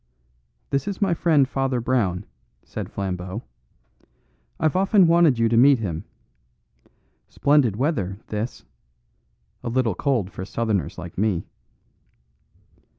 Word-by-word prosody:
"This 140 -1 0
is 200 -2 -3
my 195 -4 +2
friend 155 -5 +3
Father 135 -2 -1
Brown," 105 -6 0 0.4
said - - -7
Flambeau. 95 +2 -4 1.2
"I've 155 +1 +1
often 195 0 +4
wanted 165 -5 +4
you 115 0 +3
to 115 - +1
meet 135 +4 +6
him. 85 -8 -4 1.2
Splendid 140 -7 +3
weather, 105 - -1
this; 110 +3 -5 1.0
a - - -3
little 120 -3 +1
cold 120 -6 -1
for 95 - -6
Southerners 105 -1 -2
like 85 +1 -7
me." 100 -5 0
120 Hz, 115 wpm, -23 LUFS, 100-145 Hz, 1.2 s, meet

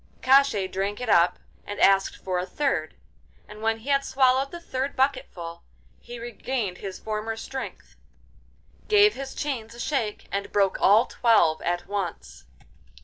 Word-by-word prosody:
Koshchei 270 -6 +4
drank 195 +2 -3
it 250 -2 -4
up 175 -2 +4 0.3
and 205 - -7
asked 195 0 +4
for 185 -1 -2
a 180 - -2
third, 280 +9 -1 0.5
and 210 0 -11
when 225 0 +1
he 230 +5 -9
had 275 0 +3
swallowed 265 0 +2
the 345 - -8
third 275 -4 -4
bucketful, 255 -11 -2 0.4
he 240 - -9
regained 235 -4 -4
his 195 -2 -6
former 220 +1 -4
strength, 265 +3 -7 0.9
gave 420 0 +5
his 270 0 -7
chains 235 -6 -4
a - - -12
shake, 235 -6 -2
and 200 +2 -3
broke 200 -2 +1
all 215 +5 +6
twelve 215 -13 +3
at 175 +1 -2
once. 195 - -5
225 Hz, 150 wpm, -25 LUFS, 195-265 Hz, 0.9 s, all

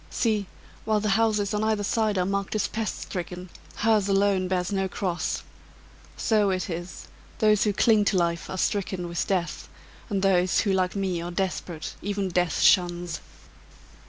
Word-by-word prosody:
"See! 215 -4 0 0.4
while 215 -1 +1
the 210 0 -1
houses 210 -1 +2
on 210 +1 0
either 215 -1 +1
side 215 -1 +1
are 180 - +2
marked 200 +2 -2
as 215 - +1
pest 220 -1 -3
stricken, 180 -1 -6 0.2
hers 215 -2 +2
alone 195 -1 +2
bears 180 +1 -1
no 195 -1 0
cross. 180 -2 -2 0.7
So 210 -3 +2
it 185 -1 -1
is: 175 +2 -6 0.3
those 215 -1 +3
who 210 - +3
cling 215 0 +4
to 200 - +2
life 170 -1 0
are 190 - -4
stricken 185 -2 -1
with 170 0 -2
death: 175 -5 -2 0.4
and 195 -2 -1
those 185 -2 +3
who, 200 -3 +1
like 185 0 +1
me, 190 -3 -1
are 170 - -4
desperate, 175 -3 -3
even 200 -1 -2
death 175 -2 0
shuns." 175 -3 +3
195 Hz, 165 wpm, -26 LUFS, 180-210 Hz, 0.7 s, cling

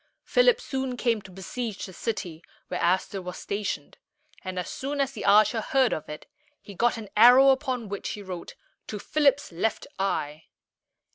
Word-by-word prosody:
Philip - - +4
soon 265 - -3
came 235 -3 +1
to 195 - -13
besiege 205 +4 -5
the 185 - -10
city 180 -7 -4 0.3
where - - -3
Aster 190 +2 +1
was 180 0 -7
stationed; 200 -8 -4 0.4
and 185 0 -5
as 180 - -2
soon 285 +2 -4
as 275 -1 +1
the - - -7
archer 215 +3 +5
heard 260 +1 +2
of 155 - -5
it, 150 - -8 0.3
he 200 - -12
got 240 +5 +1
an 215 -3 -8
arrow 250 +5 +8
upon 260 -4 0
which 200 0 -5
he 205 - -8
wrote, 180 -3 -7 0.3
"To 210 - -5
Philip's 280 +3 +1
left 190 +6 -1
eye." 155 -5 -2
215 Hz, 170 wpm, -26 LUFS, 185-260 Hz, 0.4 s, arrow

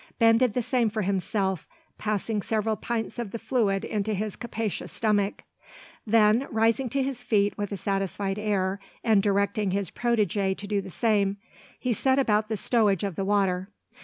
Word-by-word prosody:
Ben 225 0 +5
did 250 -4 +2
the 250 - +1
same 250 -2 +1
for 215 0 -2
himself, 190 -1 -1 0.3
passing 215 0 -1
several 220 +1 0
pints 230 +2 -3
of 230 -5 -4
the - - -3
fluid 215 -6 0
into 215 0 -1
his 210 +1 -3
capacious 225 -3 -4
stomach. 205 -2 0 0.6
Then 220 +3 +4
rising 225 +3 +2
to 275 +3 0
his 260 -2 -3
feet 205 -4 +1
with 205 -1 -4
a 200 - -3
satisfied 195 +1 -2
air, 200 -2 0 0.2
and 220 -3 +4
directing 200 0 +1
his 195 -2 -1
protege 205 -5 +1
to 205 - -8
do 200 0 0
the 190 - -9
same, 200 0 +1 0.4
he 250 -2 0
set 260 +4 +2
about 215 -5 +2
the 220 - -1
stowage 210 -5 +2
of 195 -4 -2
the 195 - -2
water. 195 -2 +1
210 Hz, 175 wpm, -26 LUFS, 195-225 Hz, 0.6 s, Ben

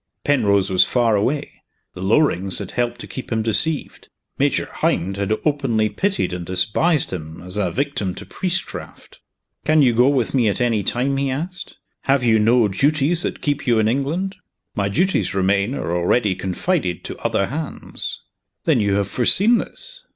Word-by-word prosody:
Penrose 100 -9 +2
was 90 - +6
far 120 -3 +2
away; 130 +8 -2 0.3
the 90 - -9
Lorings 95 - +2
had 100 -3 -5
helped 120 -1 -2
to - - -6
keep 130 - -7
him 110 -1 0
deceived; 140 +8 -1 0.3
Major - - +2
Hynd 95 +3 0
had 100 +1 -2
openly 130 -8 +1
pitied 195 - -1
and 90 -1 -4
despised 105 - +1
him 80 -2 -7
as 90 +1 -5
a 100 -4 0
victim 105 -4 -2
to - - -8
priestcraft. 190 0 -4 0.4
"Can 155 -1 +4
you 125 -3 +4
go 120 +3 +4
with 130 -5 0
me 125 -5 +2
at 100 - -2
any 115 -4 +1
time?" 130 +7 0
he 135 0 0
asked. 170 +8 -4 0.3
"Have 135 -1 +2
you 115 -2 +4
no 115 +1 +4
duties 145 - +2
that - - -3
keep 145 -1 -1
you 120 -2 +3
in 110 -1 +2
England?" 150 - -1 0.4
"My 100 -2 0
duties, 170 - 0
Romayne, 100 +5 +1
are 85 - -2
already 95 +4 +2
confided 95 - -2
to - - -7
other 100 - 0
hands." 150 +6 -3 0.4
"Then 150 -7 +3
you 100 -2 +1
have 100 -1 0
foreseen 200 - +4
this?" - - -7
120 Hz, 175 wpm, -20 LUFS, 100-145 Hz, 0.4 s, was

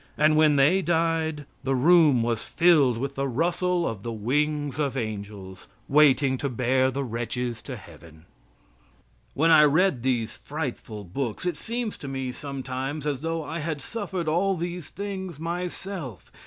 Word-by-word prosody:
And 155 +1 +4
when 155 -1 +5
they 150 +8 +4
died, 160 -3 0 0.2
the 135 0 +1
room 150 -3 +5
was 115 -1 -1
filled 155 -9 +4
with 135 +3 -3
the 140 0 -1
rustle 175 +6 0
of 110 -4 -4
the 115 - -4
wings 145 +6 -1
of 140 -3 -1
angels, 100 -4 -6 0.2
waiting 140 -2 +4
to 140 - -1
bear 130 +2 +2
the 135 +2 -2
wretches 120 0 -3
to 130 - -7
Heaven. 80 -5 -14 1.1
When 165 +4 +3
I 155 -1 +8
read 150 -1 +3
these 120 -3 -1
frightful 130 -8 -5
books 115 - -4
it 175 -3 0
seems 230 +5 -4
to 140 - -7
me 135 -1 -3
sometimes 135 +1 -5
as 145 -3 -1
though 165 0 -2
I 160 +3 -5
had 155 -1 -3
suffered 190 0 -4
all 185 +5 +2
these 175 -1 -5
things 190 -5 -6
myself. 170 - -5
145 Hz, 155 wpm, -26 LUFS, 125-165 Hz, 1.1 s, I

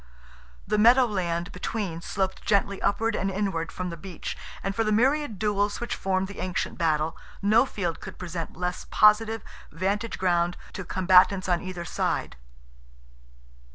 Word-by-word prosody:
The 210 - +1
meadow 245 +4 +7
land 180 -4 -2
between 180 -3 -4
sloped 190 +1 -2
gently 200 -1 +1
upward 225 +2 +1
and 195 - 0
inward 190 -4 -2
from 180 -1 -4
the 170 - -7
beach, 185 -4 -6 0.3
and 195 - -1
for 225 - +2
the 215 - 0
myriad 260 +1 +2
duels 205 0 0
which 240 - -3
formed 190 0 -1
the 200 - -9
ancient 185 -1 -2
battle, 155 -1 +1 0.3
no 215 +6 +5
field 175 -8 -3
could - - -9
present 170 -3 -6
less 180 0 -3
positive 215 +1 +4 0.3
vantage 200 +6 -2
ground 175 -1 +1 0.2
to 190 - -5
combatants 185 +1 +4
on 175 -2 +1
either 185 -2 -6
side. - - -2
190 Hz, 155 wpm, -26 LUFS, 180-210 Hz, 0.3 s, meadow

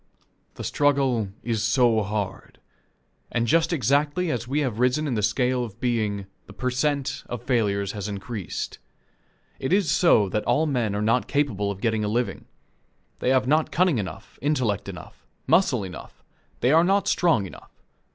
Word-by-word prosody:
The - - -7
struggle 135 -6 +1 0.2
is 115 -3 -1
so 115 0 +3
hard. 105 -2 -4 0.7
And 120 0 0
just 165 +8 +2
exactly 145 +4 +1
as 120 -1 -3
we 145 +4 0
have 120 -6 -2
risen 125 +5 +2
in 140 - -1
the 110 - 0
scale 125 +3 +1
of 110 -2 -8
being, 110 -5 -1 0.2
the 105 - -12
per 125 +4 -2
cent, 140 +1 -1
of 120 -1 -5
failures 100 -6 0
has 105 -1 -5
increased. 100 -1 -5 0.8
It 130 - -3
is 190 -6 +3
so 110 - +4
that 105 +2 -1
all 120 +7 +2
men 120 -8 0
are 105 - -1
not 115 +3 +2
capable 110 -9 0
of 100 -1 -5
getting 110 -2 0
a - - 0
living. 120 +3 -2 0.7
They - - 0
have 130 -1 +3
not 155 +4 +2
cunning 175 -7 +2
enough, 95 -2 -7
intellect 130 -8 0
enough, - - -11 0.2
muscle 130 - +3
enough 90 -3 -10 0.4
they 125 - +3
are 165 +2 +6
not 195 +2 +2
strong 160 - +2
enough. 95 - -12
120 Hz, 170 wpm, -25 LUFS, 105-145 Hz, 0.8 s, are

